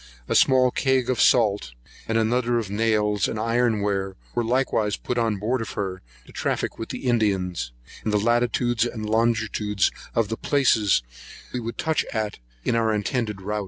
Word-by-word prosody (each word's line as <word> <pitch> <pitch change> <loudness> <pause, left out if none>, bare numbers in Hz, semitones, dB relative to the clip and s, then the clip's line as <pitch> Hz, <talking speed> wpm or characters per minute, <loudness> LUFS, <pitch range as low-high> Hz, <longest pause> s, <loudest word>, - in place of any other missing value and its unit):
A - - 0
small 130 -1 +5
cag 130 -2 +1
of 125 - 0
salt, 105 - +3 0.3
and 115 - +1
another 120 +2 +1
of 110 -4 -3
nails 105 -2 +1
and 110 - -4
iron 115 -1 +1
ware, 95 -1 -1 0.2
were 120 - 0
likewise 115 -3 +1
put 125 - -2
on 115 -3 +1
board 115 +5 -1
of 115 - -5
her, 95 -2 -3 0.2
to - - -15
traffic - - -2
with 115 - -5
the - - -6
Indians, 95 - 0 0.3
and 110 - -1
the 105 - +3
latitudes 120 +1 +1
and 110 -3 -3
longitudes 110 -2 +1 0.2
of 115 -3 +1
the 115 - -3
places 115 - +2 0.5
we 125 - -1
would 115 0 -5
touch 160 -1 +1
at, 110 - -2 0.3
in - - +1
our 115 -1 +2
intended 105 -1 -2
rout. 105 +2 -2
110 Hz, 175 wpm, -24 LUFS, 105-120 Hz, 0.5 s, small